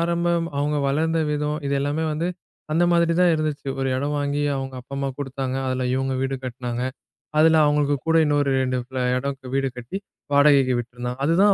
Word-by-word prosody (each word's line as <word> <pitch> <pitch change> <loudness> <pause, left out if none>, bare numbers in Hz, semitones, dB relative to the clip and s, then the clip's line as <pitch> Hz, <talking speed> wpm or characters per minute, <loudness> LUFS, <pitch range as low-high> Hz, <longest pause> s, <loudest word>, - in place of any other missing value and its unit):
ஆரம்பம், 170 0 +1
அவங்க 150 +1 0
வளர்ந்த 160 +3 +1
விதம், 150 0 -1
இது 140 - 0
எல்லாமே 145 +3 -1
வந்து 165 +4 -1 0.4
அந்த 170 +2 +3
மாரிதான் 170 +1 +4
இருந்துச்சு. 155 -2 -2
ஒரு 135 0 0
இடம் 145 +2 -1
வாங்கி 145 0 -1
அவங்க 135 0 -5
அப்பா 140 +2 -10
அம்மா 140 0 -1
குடுத்தாங்க. 135 -1 -3
அதில 130 0 -1
இவங்க 135 0 -1
வீடு 135 0 -1
கட்டினாங்க. 125 -1 -4 0.6
அதில 160 +1 +6
அவங்களுக்கு 145 -1 +2
கூட 165 - +4
இன்னொரு 145 -1 +2
2 130 0 0
ஃப்ல 130 +1 -5 0.2
இடம் 140 +1 -3 0.2
வீடு 135 0 +1
கட்டி 125 +10 -5 0.4
வாடகைக்கு 140 -3 +5
விட்டுருந்தாங்க. 125 +1 -5
அதுதான் 195 +6 +5
145 Hz, 170 wpm, -23 LUFS, 130-160 Hz, 0.6 s, அதில